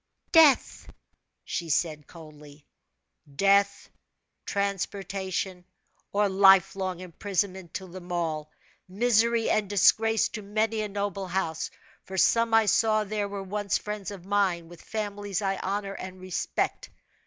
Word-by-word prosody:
"Death!" 315 Hz, -5 st, +5 dB, 0.6 s
she 170 Hz, -2 st, -4 dB
said, 155 Hz, -1 st, -1 dB
coldly. 150 Hz, -3 st, -14 dB, 0.7 s
"Death, 200 Hz, +3 st, +3 dB, 0.6 s
transportation, 195 Hz, -2 st, -3 dB, 0.5 s
or 205 Hz, 0 st, +2 dB
life 195 Hz, -1 st, +5 dB
long 185 Hz, -2 st, -3 dB
imprisonment 185 Hz, 0 st, -3 dB
to 190 Hz, -, -4 dB
them 180 Hz, 0 st, -10 dB
all 160 Hz, -3 st, -2 dB, 0.4 s
misery 230 Hz, +3 st, +2 dB
and 210 Hz, -2 st, +1 dB
disgrace 220 Hz, +2 st, +4 dB
to 215 Hz, -, -6 dB
many 215 Hz, +2 st, -1 dB
a 210 Hz, -, -2 dB
noble 200 Hz, -1 st, -3 dB
house; 170 Hz, -3 st, -2 dB, 0.3 s
for 190 Hz, -, -7 dB
some 230 Hz, +4 st, +3 dB
I 225 Hz, 0 st, +5 dB
saw 215 Hz, +1 st, +3 dB
there 210 Hz, 0 st, -3 dB
were 200 Hz, -1 st, -5 dB
once 200 Hz, +1 st, -1 dB
friends 210 Hz, -2 st, -5 dB
of 195 Hz, -3 st, -9 dB
mine, 190 Hz, -4 st, 0 dB
with 175 Hz, -, -13 dB
families 205 Hz, -2 st, -4 dB
I 195 Hz, -2 st, -1 dB
honor 200 Hz, +1 st, -3 dB
and 185 Hz, -1 st, -8 dB
respect. 185 Hz, -1 st, -3 dB
195 Hz, 130 wpm, -27 LUFS, 185-210 Hz, 0.7 s, Death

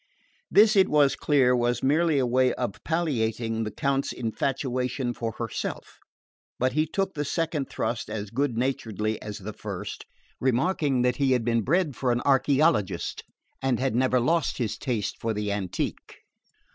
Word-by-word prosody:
This, 215 Hz, +1 st, +6 dB
it 190 Hz, -1 st, +5 dB
was 145 Hz, -2 st, +4 dB
clear, 130 Hz, -4 st, +3 dB
was 120 Hz, 0 st, 0 dB
merely 155 Hz, +3 st, +3 dB
a 130 Hz, -, +2 dB
way 125 Hz, +1 st, +3 dB
of 120 Hz, -6 st, -4 dB
palliating 115 Hz, -8 st, -1 dB
the -, -, -2 dB
Count's 140 Hz, 0 st, 0 dB
infatuation 125 Hz, +1 st, -2 dB
for 115 Hz, -2 st, -4 dB
herself; -, -, -5 dB, 0.6 s
but 130 Hz, 0 st, +1 dB
he 155 Hz, +2 st, +1 dB
took 190 Hz, +4 st, -1 dB
the 145 Hz, -, -2 dB
second 155 Hz, -1 st, -2 dB
thrust 120 Hz, -1 st, -3 dB
as 105 Hz, -2 st, -5 dB
good 130 Hz, -1 st, -1 dB
naturedly 110 Hz, -4 st, -1 dB
as 105 Hz, -1 st, -6 dB
the 105 Hz, +2 st, -7 dB
first, -, -, -6 dB, 0.3 s
remarking 130 Hz, +1 st, +1 dB
that 125 Hz, -1 st, +1 dB
he 135 Hz, -2 st, +3 dB
had 120 Hz, -3 st, 0 dB
been 115 Hz, -1 st, +2 dB
bred 155 Hz, -, +1 dB
for 125 Hz, -2 st, 0 dB
an 120 Hz, 0 st, 0 dB
archeologist 135 Hz, -, +2 dB, 0.4 s
and 130 Hz, -3 st, +1 dB
had 130 Hz, -1 st, 0 dB
never 130 Hz, +1 st, +2 dB
lost 160 Hz, +5 st, +1 dB
his 115 Hz, -4 st, -1 dB
taste 120 Hz, -7 st, -2 dB
for 115 Hz, -1 st, -1 dB
the 105 Hz, -1 st, -2 dB
antique. 100 Hz, -3 st, -4 dB
125 Hz, 160 wpm, -26 LUFS, 115-145 Hz, 0.6 s, This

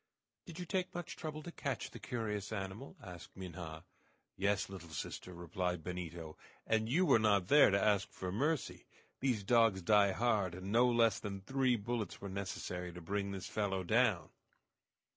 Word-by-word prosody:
"Did 170 Hz, -2 st, -9 dB
you 180 Hz, -, -4 dB
take 185 Hz, 0 st, -2 dB
much 175 Hz, -2 st, -5 dB
trouble 155 Hz, -1 st, -5 dB
to 175 Hz, -, -7 dB
catch 140 Hz, -5 st, -3 dB
the -, -, -9 dB
curious 105 Hz, -5 st, -3 dB
animal?" 100 Hz, +5 st, -5 dB
asked 90 Hz, -1 st, -10 dB
Minha. 85 Hz, -3 st, -7 dB, 0.5 s
"Yes, 100 Hz, +2 st, +1 dB
little 95 Hz, -4 st, -9 dB
sister," 80 Hz, +3 st, -5 dB
replied 90 Hz, 0 st, -3 dB
Benito, 85 Hz, -3 st, -6 dB, 0.3 s
"and 110 Hz, 0 st, +1 dB
you 175 Hz, +9 st, +3 dB
were 115 Hz, -, +6 dB
not 100 Hz, -4 st, +3 dB
there 145 Hz, 0 st, +8 dB
to 100 Hz, 0 st, +3 dB
ask 100 Hz, -1 st, +2 dB
for 90 Hz, -1 st, -4 dB
mercy! 145 Hz, -, -1 dB, 0.3 s
These 125 Hz, -6 st, +1 dB
dogs 115 Hz, -3 st, +4 dB
die 105 Hz, 0 st, +5 dB
hard, 105 Hz, -6 st, +1 dB
and 95 Hz, +2 st, -6 dB
no 120 Hz, +3 st, +5 dB
less 115 Hz, -3 st, +4 dB
than 100 Hz, -1 st, -5 dB
three 130 Hz, +3 st, +2 dB
bullets 115 Hz, -2 st, -3 dB
were 100 Hz, -, -6 dB
necessary 95 Hz, -2 st, -4 dB
to 90 Hz, -, -9 dB
bring 100 Hz, +4 st, -2 dB
this 95 Hz, -1 st, -5 dB
fellow 95 Hz, -3 st, -1 dB
down." 110 Hz, -3 st, +2 dB
100 Hz, 170 wpm, -35 LUFS, 90-120 Hz, 0.5 s, there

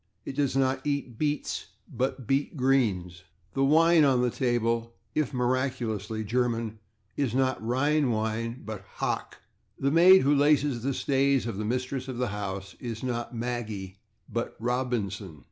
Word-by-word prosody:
It 135 Hz, -, -5 dB
does 140 Hz, -2 st, +1 dB
not 130 Hz, 0 st, +2 dB
eat 140 Hz, -5 st, -2 dB
/beets/, 150 Hz, -1 st, -1 dB, 0.2 s
but 130 Hz, -1 st, -2 dB
/beet 140 Hz, +4 st, 0 dB
roots/. 100 Hz, -10 st, +1 dB, 0.3 s
The 135 Hz, -, +1 dB
wine 160 Hz, +3 st, +5 dB
on 130 Hz, -3 st, +4 dB
the 125 Hz, -, +1 dB
table, 115 Hz, -2 st, 0 dB, 0.2 s
if 150 Hz, -4 st, 0 dB
miraculously 120 Hz, -5 st, -1 dB
German, 115 Hz, -1 st, -1 dB, 0.4 s
is 130 Hz, -5 st, -1 dB
not 130 Hz, -2 st, +1 dB
/Rhine 135 Hz, +5 st, +2 dB
wine/, 115 Hz, +2 st, -2 dB
but 105 Hz, -3 st, -6 dB
/Hock/.... -, -, -2 dB, 0.4 s
The 140 Hz, +1 st, +1 dB
maid 180 Hz, +4 st, +7 dB
who 140 Hz, +2 st, +4 dB
laces 145 Hz, -3 st, +3 dB
the 135 Hz, +2 st, -1 dB
stays 135 Hz, -1 st, +2 dB
of 115 Hz, -4 st, -4 dB
the 105 Hz, -, -2 dB
mistress 130 Hz, +3 st, -2 dB
of 130 Hz, -2 st, -5 dB
the 125 Hz, -1 st, 0 dB
house 95 Hz, -1 st, -5 dB
is 115 Hz, -2 st, -5 dB
not 120 Hz, -1 st, -3 dB
/Maggie/ 110 Hz, -5 st, -4 dB, 0.3 s
but 115 Hz, +2 st, -4 dB
/Robinson 110 Hz, -, -2 dB
125 Hz, 150 wpm, -28 LUFS, 110-135 Hz, 0.4 s, maid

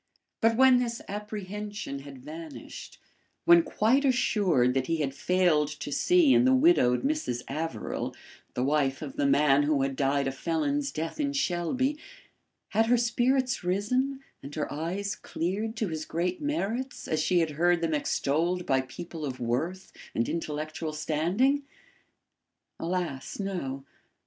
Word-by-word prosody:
But 225 Hz, 0 st, +3 dB
when 260 Hz, -1 st, +7 dB
this 235 Hz, -1 st, -2 dB
apprehension 210 Hz, -5 st, -5 dB
had 140 Hz, -1 st, -10 dB
vanished; 160 Hz, 0 st, -9 dB, 0.5 s
when 170 Hz, 0 st, +8 dB
quite 230 Hz, +10 st, +2 dB
assured 195 Hz, -, +2 dB
that 130 Hz, 0 st, 0 dB
he 165 Hz, -, +1 dB
had 140 Hz, -3 st, -1 dB
failed 175 Hz, -2 st, +2 dB
to -, -, -5 dB
see 345 Hz, -, +4 dB
in -, -, +5 dB
the 260 Hz, +1 st, +5 dB
widowed 260 Hz, -, +4 dB
Mrs. 275 Hz, -, -1 dB
Averill 160 Hz, +3 st, -4 dB, 0.4 s
the 125 Hz, -, 0 dB
wife 135 Hz, -1 st, +1 dB
of 270 Hz, -, -7 dB
the 290 Hz, -1 st, +1 dB
man 145 Hz, -, +4 dB
who 145 Hz, -2 st, +2 dB
had 135 Hz, 0 st, -1 dB
died 140 Hz, 0 st, +1 dB
a -, -, 0 dB
felon's 145 Hz, -1 st, -1 dB
death 160 Hz, -, -4 dB
in 285 Hz, -1 st, 0 dB
Shelby, 260 Hz, -, 0 dB, 0.7 s
had 225 Hz, +1 st, +2 dB
her 245 Hz, +1 st, +4 dB
spirits 245 Hz, +1 st, +1 dB
risen 250 Hz, +9 st, 0 dB, 0.2 s
and 140 Hz, +2 st, -9 dB
her 155 Hz, -, -3 dB
eyes 190 Hz, +7 st, -3 dB
cleared 210 Hz, +7 st, -3 dB
to 215 Hz, -4 st, -1 dB
his 155 Hz, -1 st, -4 dB
great 175 Hz, +2 st, -2 dB
merits 265 Hz, -4 st, -2 dB
as 155 Hz, -1 st, 0 dB
she 180 Hz, +3 st, +2 dB
had 165 Hz, -2 st, +2 dB
heard 175 Hz, +3 st, +2 dB
them 165 Hz, -1 st, 0 dB
extolled 165 Hz, +4 st, 0 dB
by 135 Hz, -1 st, +2 dB
people 160 Hz, +5 st, -8 dB
of 130 Hz, -3 st, -4 dB
worth 155 Hz, +11 st, -2 dB, 0.2 s
and 115 Hz, -, +1 dB
intellectual 155 Hz, 0 st, -3 dB
standing? 175 Hz, -, +1 dB, 1.2 s
Alas, 170 Hz, -5 st, -3 dB
no. 140 Hz, -9 st, -4 dB
170 Hz, 150 wpm, -28 LUFS, 145-225 Hz, 1.2 s, when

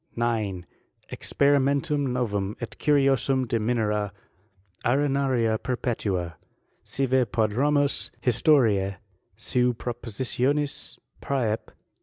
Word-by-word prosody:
9. 110 Hz, -6 st, -1 dB, 0.5 s
Experimentum 140 Hz, 0 st, +1 dB
novum 105 Hz, -5 st, -2 dB
et 120 Hz, -, -6 dB
curiosum 135 Hz, -3 st, +2 dB
de 115 Hz, -2 st, 0 dB
Minera 105 Hz, -3 st, 0 dB, 0.7 s
arenaria 130 Hz, -4 st, +1 dB
perpetua, 100 Hz, -, -2 dB, 0.5 s
sive 130 Hz, -2 st, +1 dB
prodromus 140 Hz, +6 st, +1 dB
historice 110 Hz, -7 st, +3 dB, 0.4 s
seu 125 Hz, 0 st, +1 dB
propo* 120 Hz, 0 st, -6 dB
sitionis 135 Hz, +5 st, -1 dB, 0.2 s
Prsep. 115 Hz, -6 st, -1 dB
125 Hz, 80 wpm, -26 LUFS, 110-140 Hz, 0.7 s, historice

